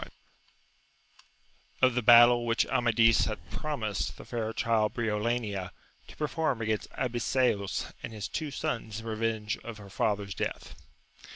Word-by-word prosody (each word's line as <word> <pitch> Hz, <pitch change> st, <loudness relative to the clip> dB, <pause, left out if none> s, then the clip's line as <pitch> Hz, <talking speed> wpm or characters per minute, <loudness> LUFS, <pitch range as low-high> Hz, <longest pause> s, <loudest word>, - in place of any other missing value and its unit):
— 135 Hz, 0 st, -32 dB
Of 130 Hz, -1 st, +6 dB
the 125 Hz, -, 0 dB
battle 120 Hz, +1 st, +7 dB
which 115 Hz, 0 st, +2 dB
Amadis 115 Hz, -1 st, +3 dB
had 110 Hz, -2 st, -6 dB
promised 140 Hz, -, -3 dB
the -, -, -11 dB
fair 115 Hz, -2 st, -3 dB
child 115 Hz, -1 st, +1 dB
Briolania 105 Hz, -4 st, -1 dB, 0.4 s
to -, -, -13 dB
perform 150 Hz, -3 st, -1 dB
against 110 Hz, -2 st, -2 dB
Abiseos 120 Hz, -4 st, 0 dB
and -, -, -6 dB
his 105 Hz, -3 st, -5 dB
two 155 Hz, -2 st, -4 dB
sons 115 Hz, -8 st, -3 dB
in -, -, -12 dB
reyenge 110 Hz, -1 st, -2 dB
of 115 Hz, -2 st, -7 dB
her 100 Hz, -2 st, -12 dB
fatheir's 100 Hz, 0 st, -1 dB
death. -, -, -4 dB
115 Hz, 135 wpm, -29 LUFS, 110-130 Hz, 0.4 s, battle